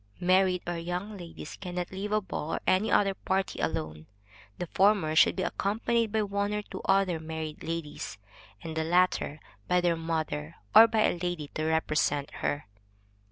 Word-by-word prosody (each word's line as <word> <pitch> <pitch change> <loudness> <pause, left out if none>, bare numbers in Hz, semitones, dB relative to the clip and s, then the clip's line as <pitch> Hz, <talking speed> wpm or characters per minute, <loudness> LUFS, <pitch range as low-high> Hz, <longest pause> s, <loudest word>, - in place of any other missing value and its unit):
Married 185 0 +3
or 175 -1 -3
young 180 +5 -4
ladies 170 -4 -9
cannot 180 -1 -4
leave 195 +2 -4
a 215 - +3
ball 170 -5 -5
room - - +2
or - - -3
any 185 +4 +2
other 195 -1 +4
party 190 0 -2
alone. 80 -1 -3 0.5
The 180 - -3
former 190 -3 +3
should - - +6
be 185 - -1
accompanied 225 +4 0
by 220 0 +1
one 200 +1 -1
or 210 - -2
two - - -8
other 195 -4 +2
married 160 -1 -6
ladies, 160 -8 -5 0.5
and 160 -1 -5
the 160 - 0
latter 175 -3 +2 0.3
by 180 - +3
their 175 -1 +2
mother, 160 - -3 0.2
or 225 - +10
by 220 -1 +1
a 175 - +2
lady 175 -5 -3
to 155 - -3
represent 155 -3 +1
her. 145 - -1
175 Hz, 175 wpm, -29 LUFS, 160-195 Hz, 0.5 s, or